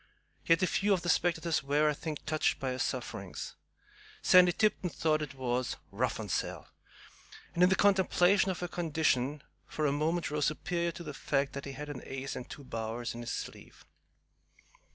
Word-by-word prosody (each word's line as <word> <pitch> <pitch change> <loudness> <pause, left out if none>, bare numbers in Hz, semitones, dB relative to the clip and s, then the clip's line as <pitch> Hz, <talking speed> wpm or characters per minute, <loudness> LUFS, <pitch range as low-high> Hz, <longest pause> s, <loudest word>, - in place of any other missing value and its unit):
Yet 165 +2 +5
a - - +6
few 200 +2 +2
of 180 - 0
the 175 - -1
spectators 170 -1 +2
were, 145 +2 +2
I 150 - +3
think, 150 0 -6
touched 155 0 +1
by 135 -1 -1
her 125 - -4
sufferings. - - -4 0.7
Sandy 180 -1 +7
Tipton 200 -1 +1
thought 155 -2 +1
it 150 -3 -5
was 125 -1 -1
"rough - - -1
on - - -4
Sal," - - -2 0.9
and, 170 - -1
in 180 - +7
the 190 - +4
contemplation 190 -1 +4
of 180 -2 -3
her 175 - -1
condition, 150 -5 0 0.2
for 155 - -2
a 145 - +3
moment 155 +2 0
rose 150 -1 +1
superior 170 +3 -1
to 170 - -8
the 150 -3 -6
fact 140 0 0
that 140 - -5
he 140 - -6
had 150 +2 -6
an 145 -4 -6
ace 135 0 -5
and 125 - -7
two 145 - -9
bowers 115 -1 -4
in 120 - -7
his 120 - -5
sleeve. - - -7
155 Hz, 190 wpm, -31 LUFS, 135-175 Hz, 0.9 s, Sandy